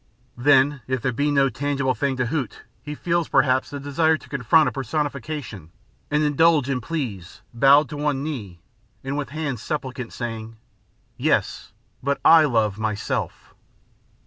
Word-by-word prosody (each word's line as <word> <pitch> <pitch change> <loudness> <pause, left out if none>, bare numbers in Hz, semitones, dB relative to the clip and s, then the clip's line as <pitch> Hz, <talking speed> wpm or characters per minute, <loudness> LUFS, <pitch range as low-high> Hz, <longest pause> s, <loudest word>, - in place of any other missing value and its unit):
Then, 135 +2 +3
if 130 0 -1
there 130 - +1
be 145 +5 0
no 140 -1 +3
tangible 135 +2 -1
thing 135 0 -1
to 125 - 0
hoot 135 -1 -4 0.2
he 150 0 -7
feels, 170 +1 -1
perhaps, 130 -1 +2
the 145 - -6
desire 155 +3 +1
to - - -17
confront 140 +4 +3
a - - 0
personification 140 - -4 0.4
and 150 +1 +1
indulge 150 -1 +3
in 125 -2 -1
pleas, 110 - -5
bowed 140 +5 +5
to 150 - -6
one 145 -2 -1
knee, 105 - -6 0.4
and 135 +1 -3
with 145 -1 -3
hands 145 -5 -4
supplicant, 130 -3 -4
saying: 115 -2 -6 0.6
"Yes, - - 0 0.3
but 140 +1 -1
I 160 -1 +8
love 110 -6 0
myself." 110 -1 -3
140 Hz, 150 wpm, -23 LUFS, 120-150 Hz, 0.6 s, I